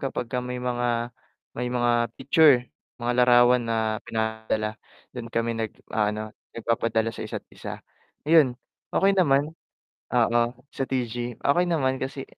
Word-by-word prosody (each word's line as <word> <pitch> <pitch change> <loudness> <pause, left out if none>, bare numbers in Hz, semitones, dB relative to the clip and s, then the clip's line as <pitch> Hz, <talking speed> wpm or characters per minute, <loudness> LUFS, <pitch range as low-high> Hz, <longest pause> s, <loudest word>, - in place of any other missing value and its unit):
kapagka 125 -2 -3
may 125 0 -5
mga 120 -1 -1 0.4
may 125 +1 -2
mga 120 -1 +1
picture 140 -2 +5 0.4
mga 120 +1 0
larawan 120 0 +5
na 110 -1 0
pinadala 110 -1 -2 0.4
dun 120 -2 -6
kami 115 0 -1
nag-aano 110 -1 -3 0.2
nagpapadala 115 -1 0
sa 110 - -7
isa't - - -6
isa. - - -7 0.4
Ayun 150 -6 +5 0.4
okay 195 +1 +4
naman, 145 -3 +3 0.6
oo 120 0 +3 0.3
sa 135 - -2
TG 120 -2 -2
okay 175 +6 +3
naman 130 -5 +1
kasi 135 0 -4
120 Hz, 125 wpm, -25 LUFS, 115-130 Hz, 0.6 s, picture